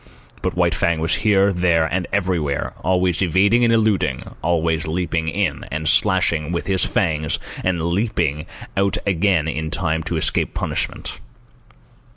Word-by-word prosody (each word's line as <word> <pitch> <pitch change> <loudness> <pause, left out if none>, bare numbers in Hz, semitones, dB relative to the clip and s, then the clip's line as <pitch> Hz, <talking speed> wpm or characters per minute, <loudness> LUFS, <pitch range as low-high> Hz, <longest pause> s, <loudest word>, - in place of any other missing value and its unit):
But - - -2
White 85 -2 +2
Fang 85 0 0
was 80 0 0
here, 100 -2 +3
there, 85 -2 +2
and 90 +2 -2
everywhere, 90 -8 -1
always 90 -1 +1
evading 100 +6 +3
and 115 - +4
eluding, 110 - +1
and - - -12
always 80 -1 0
leaping 80 -1 -1
in 85 -3 -1
and 80 0 -3
slashing 85 -4 +3
with 85 - -2
his 95 -3 +2
fangs 75 -1 0 0.3
and 90 -3 0
leaping 85 -5 -1 0.3
out 100 0 +1
again 95 -4 +1
in 80 -1 -3
time 80 -2 -1
to 85 - -2
escape 80 - 0
punishment. - - -3
85 Hz, 150 wpm, -20 LUFS, 80-95 Hz, 0.3 s, and